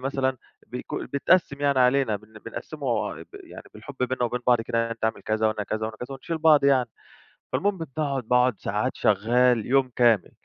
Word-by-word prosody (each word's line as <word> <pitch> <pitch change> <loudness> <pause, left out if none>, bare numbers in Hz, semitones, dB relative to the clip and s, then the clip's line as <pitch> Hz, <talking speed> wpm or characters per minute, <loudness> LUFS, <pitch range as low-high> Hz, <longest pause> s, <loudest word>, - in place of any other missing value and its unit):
مثلًا 130 0 -1 0.3
بيكو 125 - -6
بيتقسّم 140 0 +2
يعني 140 -2 +2
علينا، 125 -3 +3
بن 110 +1 -15
بنقسّمه - - -3
بال - - -11 0.2
يعني - - -10
بالحب 110 +7 -10
بيننا 125 -1 0
وبين 120 +1 -2
بعض 120 -2 +4
كده، 115 0 -2
يعني 115 0 0
أنت 115 - -6
اعمل 110 0 -1
كذا 110 0 0
وأنا 105 -1 -2
كذا 110 +2 -3
وأنا 110 0 -7
كذا 125 +4 -7
ونشيل 160 +4 -5
بعض 155 -3 +5
يعني، 130 -3 +3 0.6
فالمهم 200 -2 0 0.2
باقعد 140 -5 -1
باقعد 125 0 +3
ساعات 105 +6 -2
شغّال 115 +2 +2
يوم 135 0 +2
كامل، 115 -6 +3
125 Hz, 185 wpm, -25 LUFS, 110-135 Hz, 0.6 s, بعض